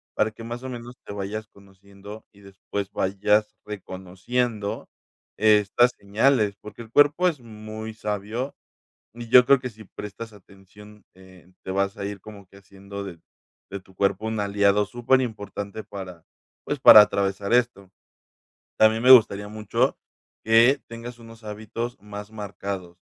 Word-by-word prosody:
para 110 - +2
que, 110 +1 -12
más 120 +1 -6
o 130 - -5
menos, 120 0 -9
te - - -8
vayas 105 +2 -5
conociendo, 100 +1 -14
y 100 - -21
después 100 0 -6
vayas 105 +2 +1
reconociendo 105 +3 -4 0.5
estas 105 +3 +4
señales. 105 +1 +1
Porque 105 +2 -10
el 110 - -17
cuerpo 145 +7 +4
es 160 -6 -1
muy 110 -1 -8
sabio, 105 +5 -4 0.6
y 120 0 -9
yo 125 +1 +7
creo 140 - +6
que 125 0 -5
si 110 0 -14
prestas 105 +3 -9
atención, 105 +2 -17
eh, 95 -1 -18
te - - -6
vas 100 +1 -1
a - - -6
ir 100 -1 -6
como 100 -1 -13
que 100 +2 -18
haciendo 100 +1 -10
de 90 -4 -9 0.5
de 100 0 -6
tu 95 0 -22
cuerpo 100 +2 0
un 110 0 -2
aliado 100 0 +2
superimportante 110 -4 -2
para, 95 -5 -9 0.4
pues, - - -3
para 105 - +11
atravesar 100 0 -1
esto. 120 -6 0 0.9
También 110 +1 +4
me 130 - +5
gustaría 105 -4 +6
mucho 105 -1 -1 0.5
que 115 +5 +5
tengas 115 +1 -9
unos 115 0 -14
hábitos 110 +3 -6
más 105 0 -9
marcados. 100 -4 -6
105 Hz, 150 wpm, -24 LUFS, 100-115 Hz, 0.9 s, para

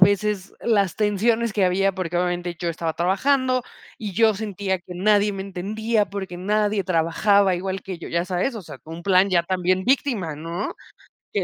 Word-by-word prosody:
veces, 200 0 +2
las 200 -6 +1
tensiones 220 +2 +1
que 195 -2 +2
había, 195 +2 +2
porque, 180 -2 -3
obviamente, 175 -1 -1
yo 170 - -2
estaba 160 0 -3
trabajando, 255 +8 +2 0.4
y 210 -3 -5
yo 220 +2 +4
sentía 195 -2 -2
que 180 +1 -11
nadie 205 +2 +3
me 195 -1 -4
entendía, 210 +3 -1
porque 190 -3 -5
nadie 210 +2 +1
trabajaba 185 +3 +3
igual 190 +1 -3
que 185 -3 -6
yo, - - -8
ya 170 +1 0
sabes, 185 +8 -1
o 215 - -6
sea, - - -10
un 165 +2 -8
plan, 190 +1 +4
ya 175 -2 +3
también 185 +1 0
víctima, 235 - +1
¿no? 170 +6 -4 0.6
Que - - 0
195 Hz, 180 wpm, -23 LUFS, 180-210 Hz, 0.6 s, yo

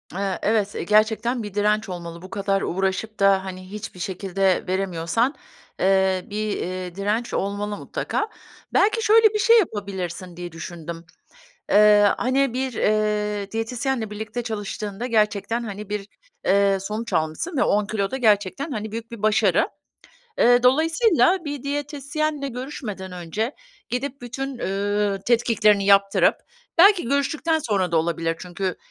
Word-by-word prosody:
Eee, 195 -1 -2
evet, 210 -2 +1
gerçekten 220 +3 +2
bir 205 -2 -7
direnç 210 +1 +1
olmalı. 170 -2 -7
Bu 185 - -10
kadar 195 0 0
uğraşıp 190 +4 -2
da, 195 -1 +4
hani, 185 0 -8
hiçbir 210 -3 -7
şekilde 190 +1 0
veremiyorsan, 185 - 0 0.4
eee, 190 -1 +2
bir, 210 0 -2
ııı, 180 -1 -5
direnç 210 +5 -1
olmalı 205 +1 -2
mutlaka. 425 - -3 0.5
Belki 435 +3 +3
şöyle 440 0 +6
bir 425 - 0
şey 460 +2 +6
yapabilirsin 190 - -4
diye 175 0 -6
düşündüm. 165 0 -8 0.7
Eee, 210 0 +6
hani, 260 0 +1
bir, 260 0 -1
eee, 210 -2 0
diyetisyenle 225 +1 -2
birlikte 220 +3 -5
çalıştığında 210 0 -4
gerçekten, 220 0 +1
hani, 210 -1 -7
bir, 205 -1 -4 0.4
eee, 200 0 +4
sonuç 215 +4 -5
almışsın 160 - -1
ve - - +3
10 205 0 +2
kilo 200 -2 -1
da 265 - -2
gerçekten 220 - +1
hani 215 -2 -4
büyük 230 0 -6
bir 230 -3 -9
başarı. 215 0 +3 0.7
Eee, 245 0 +5
dolayısıyla 330 - +3
bir 290 -3 -5
diyetisyenle 290 +1 -2
görüşmeden 240 -7 -6
önce 180 - -3 0.3
gidip 270 +3 -3
bütün, 265 +2 -5
ııı, 205 0 -1
tetkiklerini 225 -4 +3
yaptırıp 200 0 +4 0.4
belki 390 +1 +7
görüştükten 305 +4 +1
sonra 200 - -1
da - - +3
olabilir. 165 0 0
Çünkü 180 +1 -4
210 Hz, 135 wpm, -23 LUFS, 195-245 Hz, 0.7 s, belki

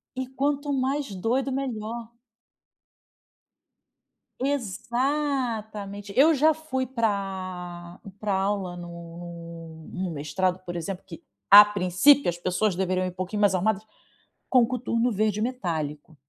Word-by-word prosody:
E 260 - -2
quanto 285 +2 -1
mais 270 -2 -1
doido 250 +8 0
melhor. 235 -3 -4 2.3
Exatamente. 235 -4 -2
Eu 315 +4 +6
já 310 +3 +4
fui 295 -4 -3
pra 185 -6 -3 0.2
pra 210 -2 -1
a 190 - +1
aula, 195 -2 -1
no 170 -1 -9
no 185 -1 -3
mestrado, 160 +5 -1
por 175 -1 -6
exemplo, 180 +2 -4
que 165 - -11 0.3
a 205 +1 +11
princípio, 205 +7 +4
as 170 - -3
pessoas 185 +3 0
deveriam 185 0 0
ir, - - -1
um - - -8
pouquinho 185 +3 -4
mais 200 -2 +4
arrumadas, 205 +2 +1 0.7
com 255 - +6
um - - +4
coturno 245 0 0
verde 210 0 0
metálico. 165 - -3
205 Hz, 125 wpm, -26 LUFS, 180-255 Hz, 2.3 s, a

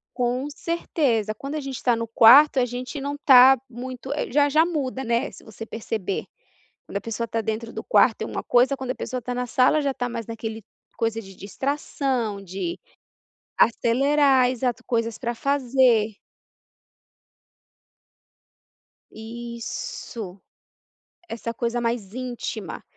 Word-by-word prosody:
Com 250 +3 -1
certeza, 285 -9 -1
quando 275 +7 -6
a - - -1
gente 270 -3 -6
tá 245 -2 +3
no 230 0 -3
quarto 260 +6 +7
a 250 - +3
gente 250 +4 -6
não 285 +1 -3
tá 265 -2 +8
muito, 255 +2 -7 0.2
já 290 +2 +3
já 310 +3 +4
muda, 275 -6 -3
né, 235 +3 0
se - - -14
você 220 +1 -9
perceber. 220 -4 -4 0.6
Quando - - -7
a - - 0
pessoa 230 +2 -4
tá 225 - -1
dentro 225 +1 -4
do - - -6
quarto - - +3
é - - -2
uma - - -4
coisa, 255 +3 +3
quando 260 -2 -5
a - - -1
pessoa 255 -1 -4
tá 250 +2 -4
na 250 0 -2
sala 255 +5 +3
já 280 -1 0
tá 245 0 -2
mais 230 -2 -5
naquele 225 -1 -6 0.3
coisa 225 0 -1
de 195 -3 -13
distração 255 -1 -2
de 185 -2 -5 0.8
acelerar, 265 +3 +3
exato, 250 -1 -2
coisas 230 -2 -1
para 240 -2 -3
fazer. 250 -5 +2 3.0
Isso, 235 - -7 0.9
essa 230 -2 -5
coisa 235 +1 -2
mais 230 -4 -3
íntima. 240 -7 -5
240 Hz, 140 wpm, -24 LUFS, 225-265 Hz, 3.0 s, tá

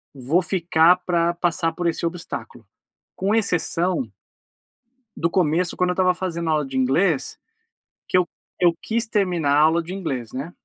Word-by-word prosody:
eh, - - -12
vou 150 +9 +2
ficar 175 -1 +3
pra 170 -1 +1
passar 165 -1 0
por 175 +1 -2
esse 170 0 -1
obstáculo.", 170 0 -6 0.5
com 195 +3 0
exceção 180 - 0 1.1
do 170 +1 0
começo, 175 -1 +1
quando 180 0 +1
eu 180 - +1
estava 185 0 +2
fazendo 170 -2 -4
aula 150 -1 +1
de 135 -1 -5
inglês, 135 +4 +1 0.7
que - - +2
eu 180 -2 +2 0.3
eu 175 -2 +4
quis 225 0 -2
terminar 180 -9 0
a - - +4
aula 160 +2 +4
de 180 +3 -7
inglês, 135 - -4
né, 140 +6 -5
170 Hz, 165 wpm, -22 LUFS, 160-180 Hz, 1.1 s, eu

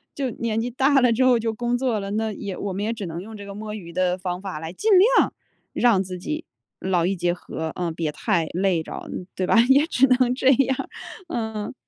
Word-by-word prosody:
就 270 -3 -1
年 225 -1 -2
纪 245 - -2
大 270 +3 +3
了 245 -2 +4
之 255 +3 +3
后 250 -2 +5
就 225 0 -1
工 240 +2 -1
作 245 -4 0
了， 195 0 -5
那 220 +1 -1
也 200 -1 -5
我 200 - -3
们 200 +3 -3
也 230 - -1
只 210 -4 -6
能 165 +1 -5
用 220 +3 -9
这 205 - -9
个 200 - -8
摸 210 +1 -6
鱼 175 -5 -8
的 180 +1 +1
方 180 0 -4
法 190 -6 -5
来 160 +1 -6
尽 425 - -2 0.3
量 - - +3 0.4
让 230 -6 +3
自 185 -1 -5
己 305 - -4 0.3
劳 180 -3 +1
逸 190 - +1
结 175 0 +1
合， 160 -2 -6
呃， 175 -2 -2
别 160 -1 -2
太 175 -4 0
累 180 -2 +1
着 - - -8 0.3
对 185 - -1
吧？ 210 - +3
也 280 +3 +5
只 270 -3 +4
能 250 -1 +3
这 260 +1 +2
样， 265 0 +1 0.4
嗯。 220 -8 -4
210 Hz, 250 characters per minute, -23 LUFS, 180-245 Hz, 0.4 s, 后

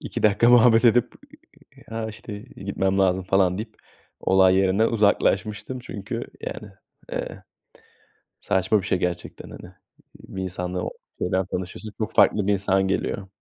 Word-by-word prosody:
İki - - -5
dakika 110 +2 +4
muhabbet 120 -1 +6
edip, 120 +1 +4 0.8
"Ha, 110 0 -4
işte, 105 -1 -8
gitmem 100 -4 -3
lazım." 95 -1 +2
falan 95 -1 +2
deyip 110 0 -7 0.4
olay 95 -1 +4
yerinden 95 +3 +3
uzaklaşmıştım 105 +2 +1
çünkü, 105 -5 -6 0.2
yani, - - -7 0.4
eee, - - -5 1.0
saçma 95 +2 +1
bir 95 - -7
şey 95 - +1
gerçekten 90 -1 -4
hani. 90 - -11 0.4
Bir 95 - -7
insanla 90 0 -4 0.4
şeyden 95 +1 0
tanışıyorsun, 95 +3 -6
çok 110 - -3
farklı 105 -2 +4
bir 105 - +3
insan 95 -1 +1
geliyor. 95 +1 -2
100 Hz, 135 wpm, -24 LUFS, 95-110 Hz, 1.0 s, muhabbet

